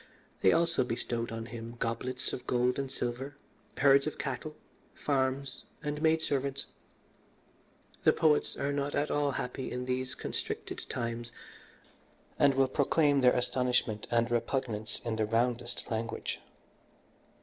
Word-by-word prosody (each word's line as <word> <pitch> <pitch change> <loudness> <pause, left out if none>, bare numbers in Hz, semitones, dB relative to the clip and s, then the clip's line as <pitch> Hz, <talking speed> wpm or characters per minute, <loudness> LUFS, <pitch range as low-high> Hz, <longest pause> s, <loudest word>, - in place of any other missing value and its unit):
They 95 - +6
also 165 -4 +3
bestowed 120 -1 -2
on 115 0 -4
him 115 0 -7
goblets 125 +3 -2
of 125 - -6
gold 125 +1 +2
and 135 -1 -3
silver, 130 +4 -3 0.4
herds 140 +1 +6
of 155 - -3
cattle, 145 +3 -4 0.4
farms, 135 -1 -1 0.2
and 150 0 -2
maidservants. 140 -4 +1 1.4
The - - +7
poets 155 -2 +2
are 140 0 0
not 140 0 -1
at 145 +1 +1
all 145 -1 +1
happy 130 +1 -3
in 125 0 -3
these 130 0 -2
constricted - - -4
times, 120 -1 -3 1.1
and 140 -2 +5
will 135 0 +4
proclaim 145 +1 +3
their 125 -1 +6
astonishment 125 -3 +1
and 120 0 +2
repugnance 115 -2 -1
in 115 -2 -1
the 110 - +2
roundest 120 +1 0
language. 115 0 -3
130 Hz, 130 wpm, -31 LUFS, 120-140 Hz, 1.4 s, The